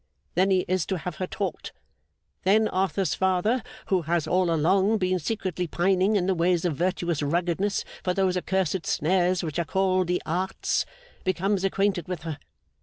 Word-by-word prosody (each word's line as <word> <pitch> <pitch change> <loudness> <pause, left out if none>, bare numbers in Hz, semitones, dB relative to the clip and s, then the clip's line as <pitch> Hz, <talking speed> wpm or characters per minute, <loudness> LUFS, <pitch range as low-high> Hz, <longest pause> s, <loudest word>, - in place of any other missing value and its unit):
Then 185 +3 +3
he 185 -1 +2
is 185 -2 0
to 190 - -1
have 180 +2 -6
her 185 - -2
taught. 195 -5 -4 0.7
Then 215 +3 +4
Arthur's 190 0 0
father, 190 +6 +1 0.3
who 190 -3 +3
has 165 0 0
all 180 +2 +2
along 190 +7 +3
been 185 -2 0
secretly 180 -1 -2
pining 190 +5 +2
in 185 -3 +2
the 190 - +2
ways 175 0 +1
of 165 -4 0
virtuous 175 -1 -1
ruggedness 175 +6 0 0.2
for 180 - +1
those 190 -2 +2
accursed 185 -1 -1
snares 180 +2 +2
which 160 0 -3
are - - +2
called 185 +1 +1
the 180 0 +1
Arts, 180 +4 -1 0.4
becomes 185 +2 0
acquainted 195 -3 0
with 180 -3 -5
her. 160 -3 -5
185 Hz, 170 wpm, -26 LUFS, 175-190 Hz, 0.7 s, Then